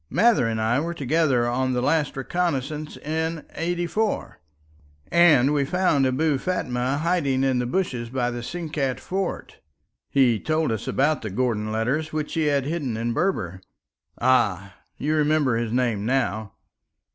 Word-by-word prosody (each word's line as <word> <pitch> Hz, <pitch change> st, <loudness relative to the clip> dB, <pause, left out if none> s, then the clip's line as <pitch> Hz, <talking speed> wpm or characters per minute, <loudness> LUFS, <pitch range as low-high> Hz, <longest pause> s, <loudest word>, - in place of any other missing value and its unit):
"Mather 215 Hz, -, +3 dB
and 110 Hz, -1 st, -1 dB
I 110 Hz, +4 st, +2 dB
were 170 Hz, +3 st, -3 dB
together 140 Hz, -4 st, +1 dB
on 130 Hz, +2 st, 0 dB
the 125 Hz, -, 0 dB
last 145 Hz, 0 st, +1 dB
reconnaissance 150 Hz, 0 st, -2 dB
in 160 Hz, +1 st, -3 dB
'84, 175 Hz, -, -2 dB, 0.7 s
and 150 Hz, -6 st, +5 dB
we 145 Hz, -2 st, +2 dB
found 145 Hz, -4 st, +2 dB
Abou 140 Hz, +2 st, +1 dB
Fatma 130 Hz, -7 st, -1 dB
hiding 150 Hz, -5 st, +1 dB
in 130 Hz, -2 st, +2 dB
the 125 Hz, -, -1 dB
bushes 125 Hz, -7 st, -2 dB
by 125 Hz, -1 st, -1 dB
the 120 Hz, 0 st, -5 dB
Sinkat 150 Hz, -2 st, -3 dB
fort. 190 Hz, 0 st, -4 dB, 0.5 s
He 125 Hz, -5 st, +3 dB
told 155 Hz, 0 st, 0 dB
us 110 Hz, -, -3 dB
about 150 Hz, +3 st, +1 dB
the 110 Hz, -, -4 dB
Gordon 110 Hz, 0 st, -1 dB
letters 125 Hz, +8 st, -1 dB
which 155 Hz, -1 st, -3 dB
he 160 Hz, -2 st, +1 dB
had 140 Hz, -2 st, +1 dB
hidden 145 Hz, -7 st, -2 dB
in 115 Hz, +1 st, -1 dB
Berber. 100 Hz, -, -1 dB, 0.6 s
Ah! 100 Hz, -7 st, +2 dB, 0.2 s
you 150 Hz, +3 st, -1 dB
remember 150 Hz, -4 st, +2 dB
his 115 Hz, -1 st, -2 dB
name 120 Hz, -4 st, 0 dB
now." 110 Hz, -4 st, -1 dB
135 Hz, 150 wpm, -24 LUFS, 120-160 Hz, 0.7 s, and